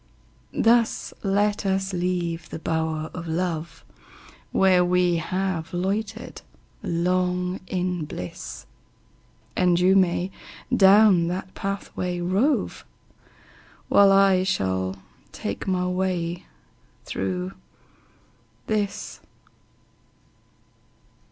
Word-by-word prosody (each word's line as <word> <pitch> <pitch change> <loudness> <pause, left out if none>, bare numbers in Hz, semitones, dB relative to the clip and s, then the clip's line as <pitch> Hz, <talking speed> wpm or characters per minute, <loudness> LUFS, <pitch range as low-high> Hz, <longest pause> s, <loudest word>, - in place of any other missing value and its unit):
Thus 230 0 +3
let 205 +1 +1
us 190 0 0
leave 175 -2 -2
the - - -5
bower 160 0 -2
of 175 -2 -6
love, 165 -1 -3 0.7
Where 185 -2 +4
we 180 -1 +2
have 180 0 -2
loitered 205 +5 -3 0.4
long 180 +1 0
in 180 -3 -2
bliss; 90 - -7 0.9
And 180 -1 +3
you 185 +2 +4
may 185 0 +2 0.4
down 195 -3 +6
that 185 +2 -4
pathway 185 -2 -3
rove, 195 +12 0 1.1
While 200 -1 +6
I 195 -1 +5
shall 95 - -1 0.4
take - - -5
my 180 -1 +1
way 180 -2 -2 0.6
through 95 -1 -3 1.1
this. 210 -2 -2
180 Hz, 85 wpm, -24 LUFS, 170-195 Hz, 1.1 s, down